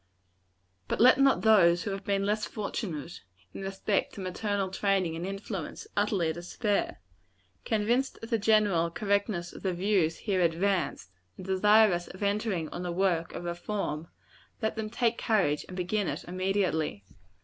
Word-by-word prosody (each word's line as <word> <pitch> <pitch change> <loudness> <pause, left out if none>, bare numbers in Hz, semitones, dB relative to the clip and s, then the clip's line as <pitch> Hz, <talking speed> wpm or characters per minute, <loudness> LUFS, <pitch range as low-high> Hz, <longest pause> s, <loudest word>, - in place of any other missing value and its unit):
But - - -2
let 255 +3 +7
not 275 -1 +4
those 180 -6 +5
who 205 - -3
have 195 0 -5
been 195 0 0
less 210 +1 0
fortunate, 175 - -5 0.3
in - - -7
respect 195 +1 -1
to - - -8
maternal 195 +1 -2
training 190 -3 0
and 170 +3 -4
influence, 195 - -5
utterly 195 -6 +1
despair. 200 +5 -2 0.7
Convinced 235 +5 +1
of 225 - -8
the 230 - +2
general 205 -6 +3
correctness 200 -2 -1
of - - -10
the 190 -2 -1
views 180 -3 +1
here 195 -4 -1
advanced, 170 - 0 0.3
and 185 - -9
desirous 190 -1 +4
of 185 +3 -8
entering 200 -5 0
on 175 - -6
the 180 -1 -3
work 170 -2 0
of - - -5
reform, 175 -2 -3 0.5
let 220 - -1
them 220 -1 -3
take 235 +1 0
courage, 185 -10 +1
and 185 - -9
begin 190 +2 -1
it - - -3
immediately. 185 - -1
195 Hz, 155 wpm, -29 LUFS, 175-210 Hz, 0.7 s, let